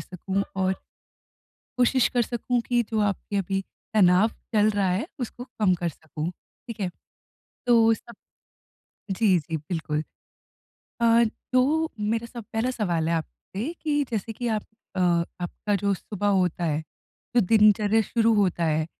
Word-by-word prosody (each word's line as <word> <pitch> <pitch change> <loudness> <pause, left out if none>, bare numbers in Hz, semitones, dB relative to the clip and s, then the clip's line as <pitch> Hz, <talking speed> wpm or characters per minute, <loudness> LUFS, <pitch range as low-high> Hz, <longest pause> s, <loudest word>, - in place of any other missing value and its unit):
सकूँ 190 +2 -3
और 190 0 +2 1.0
कोशिश 250 0 +4
कर 245 - +4
सकूँ 240 +1 -1
कि 240 -1 +2
जो 220 - +1
आपके 205 0 -1
अभी 195 0 0 0.3
तनाव 190 +1 +5 0.3
चल 210 0 +5
रहा 200 -2 +1
है, 195 - 0
उसको 245 +1 -5
कम 215 -7 +1
कर 175 0 -2
सकूँ, 160 +1 -5
ठीक 230 +4 -13
है? 190 - 0 0.8
तो 225 -1 +6
सब 235 +1 -9 1.0
जी, 190 -1 +3
जी 160 +1 -4
बिल्कुल। 155 -1 -3 1.0
अ, 235 0 +6 0.3
जो 305 +6 +3
मेरा 225 +2 0
सब 235 -2 -8
पहला 230 +3 +1
सवाल 170 -8 0
है 170 - +2
आपसे 205 - -5
कि 295 -2 +2
जैसे 225 +1 -2
कि 240 +2 -3
आप 215 -2 0 0.3
अ, - - -1 0.4
आपका 205 +4 -3
जो 200 0 +1
सुबह 205 +2 -3
होता 180 -3 +2
है, 150 -1 0 0.6
जो 240 - +6
दिनचर्या 215 0 +5
शुरू 225 +1 +2
होता 185 -4 +2
है, 155 0 +1
210 Hz, 150 wpm, -26 LUFS, 180-230 Hz, 1.0 s, तो